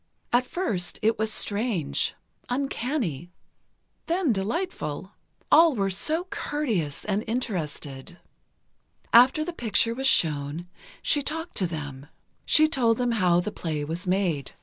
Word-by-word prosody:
At 250 +1 +3
first, 205 - -2
it 220 0 +2
was 220 0 +1
strange, 200 - -1 0.3
uncanny, 245 - -2 0.8
then 335 -6 +2
delightful. 195 - -3 0.4
All 320 -2 +7
were 195 -3 0
so 310 - +1
courteous 215 - -2
and 210 +1 0
interested. 170 - -4 1.0
After 260 +6 +6
the 350 - -4
picture 230 - +1
was 265 +3 0
shown, 155 - +1 0.4
she 295 - +2
talked 320 +4 -4
to 185 - +1
them. 145 -4 -6 0.4
She 310 0 +6
told 240 -7 +2
them 245 -1 +1
how 180 -6 +3
the 210 - -4
play 155 -6 -3
was 170 +5 -4
made. 180 -7 0
210 Hz, 125 wpm, -26 LUFS, 170-265 Hz, 1.0 s, All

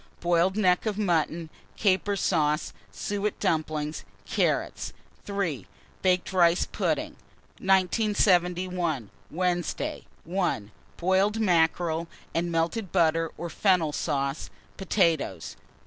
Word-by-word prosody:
Boiled 175 +3 +2
neck 185 0 +3
of 210 -2 -1
mutton, 165 -4 0 0.3
caper 200 0 +2
sauce, 155 -5 +1 0.2
suet 205 +1 -3
dumplings, 155 -4 -1 0.2
carrots. - - -1 0.3
3. 175 - -2 0.3
Baked 185 0 +1
rice 175 -1 +4
pudding. - - -1 0.5
1971. 180 - +2 0.2
Wednesday. 175 0 -2 0.2
1. 170 - -1 0.3
Boiled 190 +4 +2
mackerel 165 -3 +2 0.3
and 170 +1 -1
melted 170 +5 -1
butter 165 -2 +2
or 170 - -4
fennel 175 -3 +2
sauce, 140 0 -2 0.3
potatoes. 165 - 0
175 Hz, 95 wpm, -27 LUFS, 160-190 Hz, 0.5 s, rice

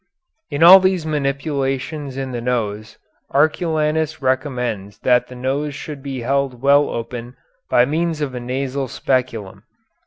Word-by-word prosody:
In 145 +3 0
all 185 +3 +11
these 185 -3 +1
manipulations 140 -1 -2
in 135 -1 -4
the 120 -1 -4
nose 110 -3 -3 0.3
Arculanus 155 0 +1
recommends 125 -7 -2
that 125 -1 +3
the 125 - -11
nose 135 +3 -2
should 145 -2 -7
be 135 -2 -5
held 135 0 -1
well 140 +2 +4
open 120 +1 -6 0.3
by 120 - +5
means 160 +3 -1
of 145 -4 -3
a 125 - -4
nasal 130 +2 -3
speculum. 120 -6 -2
135 Hz, 135 wpm, -20 LUFS, 125-150 Hz, 0.3 s, all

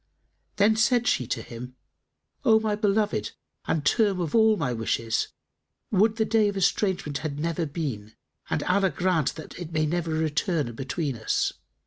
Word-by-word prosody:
Then 210 +2 +4
said 240 +1 +3
she 125 - +1
to - - -2
him, 125 +2 -9 0.7
"O 220 -4 +5
my 215 -1 0
beloved 205 - 0 0.3
and 150 -2 0
term 200 +2 +3
of 165 -4 -2
all 220 -1 +5
my 130 -6 -1
wishes, 115 0 -1 0.6
would 215 +2 +3
the 220 -1 +1
day 220 -1 +3
of 200 -1 -2
estrangement 185 -6 0
had 150 -2 -4
never 165 +1 -1
been 130 -9 -5 0.3
and - - 0
Allah 190 +1 +2
grant 165 -2 0
it 165 +1 -8
may 155 -2 +1
never 170 +1 -1
return 155 - 0
between 135 +3 -3
us!" 110 - 0
170 Hz, 155 wpm, -26 LUFS, 145-210 Hz, 0.7 s, O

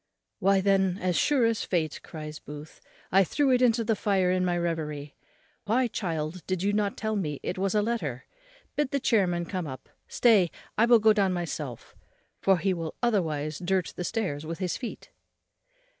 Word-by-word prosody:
"Why 195 0 +3
then 190 -1 +2
as 180 -2 0
sure 275 - +3
as 230 -1 +1
fate," 160 -4 -1
cries 155 -1 -8
Booth, 150 +1 -10 0.3
"I 195 +1 +6
threw 275 - +1
it 250 0 +3
into 235 -2 +3
the 225 0 +1
fire 195 -3 +1
in 185 0 +1
my 175 -1 +1
reverie; 150 -4 -3 0.5
why, 245 +5 +2
child, 165 -9 -2
why - - -12
did 185 -1 -1
you 205 +1 +1
not 205 -1 0
tell 220 0 -2
me 150 -8 -2
it 180 - -3
was 195 +1 0
a 210 - +3
letter? 160 - -2 0.5
bid 295 -2 +1
the 280 - 0
chairman 185 -9 +2
come 180 -2 -4
up, 130 -2 -9 0.2
stay, 210 -8 +4 0.3
I 230 +2 +4
will 240 -1 +7
go 220 0 +5
down 195 -3 +2
myself; 155 -8 -5 0.5
for 195 -1 +4
he 190 +2 +1
will 165 -2 -5
otherwise 155 -10 0
dirt 185 0 0
the 180 - -4
stairs 175 -7 -2
with 165 +1 -5
his 185 -2 -2
feet." 245 - -7
185 Hz, 190 wpm, -27 LUFS, 165-215 Hz, 0.5 s, will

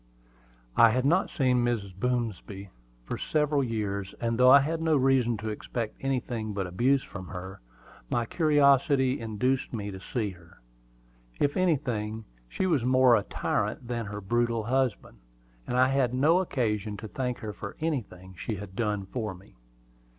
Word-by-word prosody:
I 115 - +7
had 130 +3 0
not 175 +7 +3
seen 125 -5 +2
Mrs. 110 -6 -1
Boomsby 100 -3 -3 0.3
for - - -4
several 150 -2 +1
years; 100 -5 -3
and 115 -1 0
though 125 0 +7
I 140 +2 +9
had 160 +3 -2
no 160 -2 +3
reason 130 -3 +2
to 110 +1 -4
expect 110 +1 -4
anything 120 -5 -2
but 100 -1 -2
abuse 125 +10 +2
from 95 -2 -9
her, 95 -2 -8 0.5
my 120 - 0
curiosity 140 -2 +3
induced 120 +4 -1
me 105 -3 -4
to 95 - -8
see 105 +1 -3
her. 85 -2 -17 0.8
If 145 - +1
anything, 115 - 0 0.2
she 190 - -2
was 155 -9 +2
more 130 0 +5
of 105 - 0
a - - -29
tyrant 120 - -2
than 120 -2 -3
her 105 0 -6
brutal 115 +2 0
husband, 125 - -1 0.5
and 125 - -1
I 130 +1 +5
had 130 -2 +1
no 155 +7 +4
occasion 105 - -1
to 110 - -7
thank 125 +2 -3
her 105 -1 -6
for 100 0 -8
anything 110 - -4
she 110 +5 -4
had 100 -1 -9
done 105 -3 -1
for 105 -1 -4
me. 95 +3 -18
120 Hz, 165 wpm, -28 LUFS, 105-135 Hz, 0.8 s, I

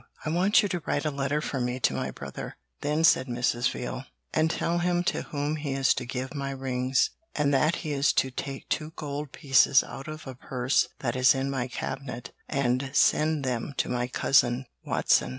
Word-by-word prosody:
'I 155 - -1
want 195 +7 +4
you 205 - 0
to 175 -2 -2
write 145 - 0
a 155 - +1
letter 140 +1 -1
for 135 -3 -3
me 125 +1 -1
to - - +3
my - - -2
brother,' - - -7 0.2
then 150 +2 0
said 130 -5 +5
Mrs. 120 0 +1
Veal, 125 +1 -5 0.3
'and 160 0 +3
tell 170 +1 0
him 175 0 +1
to - - 0
whom 150 0 -2
he 145 -2 -3
is 135 0 +3
to 125 - -5
give 130 +1 -4
my 140 -2 -3
rings, 130 -1 0 0.2
and 145 -1 +2
that 155 +5 +3
he 155 - -2
is 140 -1 +3
to 130 - +1
take 135 +1 -6
two 155 0 -2
gold 145 -1 -5
pieces 135 -2 +4
out 135 - -9
of 155 +1 -7
a 130 - -6
purse 125 +1 0
that 120 -2 -1
is 130 +1 +5
in 135 +1 -1
my 130 -2 -1
cabinet, 125 -2 -5 0.2
and 130 0 0
send 155 +1 +3
them 125 +2 -2
to - - 0
my 125 0 0
cousin 125 0 +2 0.2
Watson.' - - +2
135 Hz, 205 wpm, -27 LUFS, 130-150 Hz, 0.3 s, said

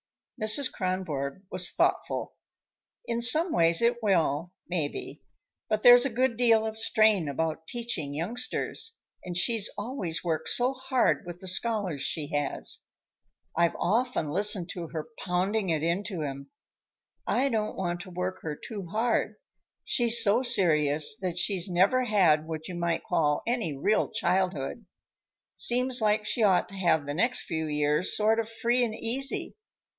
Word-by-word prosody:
Mrs. 220 +6 +5
Kronborg 185 -5 -4
was 185 -1 0
thoughtful. - - -1 0.7
"In 235 0 -2
some 310 +9 +8
ways 165 +3 +3
it 240 +1 +1
will, 170 -5 0 0.2
maybe. 160 -5 -4 0.5
But 215 -1 -1
there's 245 0 +8
a - - -4
good 250 +1 0
deal 225 -2 +3
of 220 0 -3
strain 215 -8 +2
about 160 +2 -3
teaching 230 -13 -4
youngsters, 245 - -3 0.3
and 175 -1 -5
she's 225 +2 +1
always 205 -7 -4
worked 165 -3 -2
so 250 +2 +2
hard 260 -1 0
with 175 -1 -7
the 190 - -11
scholars 190 -6 -1
she 150 -1 -3
has. 145 -1 -3 0.8
I've 170 0 +1
often 220 -5 -1
listened 190 0 +2
to 175 -3 -6
her 160 -1 -6
pounding 190 +3 -1
it 160 -2 -1
into 175 0 -2
'em. 140 -1 -7 0.8
I 265 +3 +1
don't 215 -3 -2
want 175 -2 -3
to 185 - -10
work 180 +1 -5
her 150 -2 -5
too 200 +2 -8
hard. 225 +6 -1 0.5
She's 235 -2 +2
so 215 +4 +3
serious 155 - +3
that 180 -2 -4
she's 185 0 +2
never 200 +9 +2
had 170 -9 +2
what 160 -1 -6
you 185 - -7
might 170 -1 -2
call 150 -2 0
any 225 - -2
real 210 +10 +1
childhood. 185 - -2 0.7
Seems 250 0 +4
like 210 0 +1
she 230 - 0
ought 195 -4 +3
to 195 - -11
have 170 -6 +1
the 145 - -4
next 230 +11 +1
few 160 -2 -4
years 150 +3 +1
sort 220 +1 +2
of 225 -1 -3
free 235 +2 0
and 220 -2 -2
easy. 265 +5 -2
190 Hz, 155 wpm, -27 LUFS, 165-230 Hz, 0.8 s, some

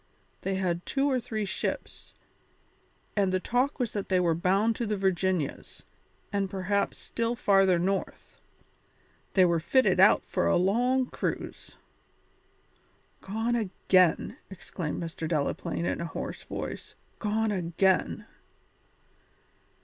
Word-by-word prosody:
They 195 0 -1
had 180 -2 -1
two 275 0 0
or 260 -2 +2
three 220 -3 -3
ships, 190 - -4 1.0
and 200 -3 +2
the 185 - +1
talk 250 +8 0
was 245 -5 -2
that 200 -2 -4
they 185 -1 +3
were 170 -2 +2
bound 195 +7 +2
to 235 - -2
the 210 0 -1
Virginias, 185 -5 -1 0.5
and 200 -1 0
perhaps 195 +1 -1
still 230 +1 -2
farther 195 -5 +4
north. 190 +3 -3 0.9
They 185 -2 +6
were 170 -1 +2
fitted 260 +11 +3
out - - +6
for - - 0
a - - +3
long 245 +8 +2
cruise." - - -5 1.5
"Gone 225 +4 -1
again!" 185 -5 +2
exclaimed 180 -4 -5
Mr. 165 -1 -5
Delaplaine 165 +2 -1
in - - -1
a - - -2
hoarse 165 - -6
voice. - - -6 0.2
"Gone 220 0 0
again!" 185 0 +1
195 Hz, 125 wpm, -28 LUFS, 180-220 Hz, 1.5 s, They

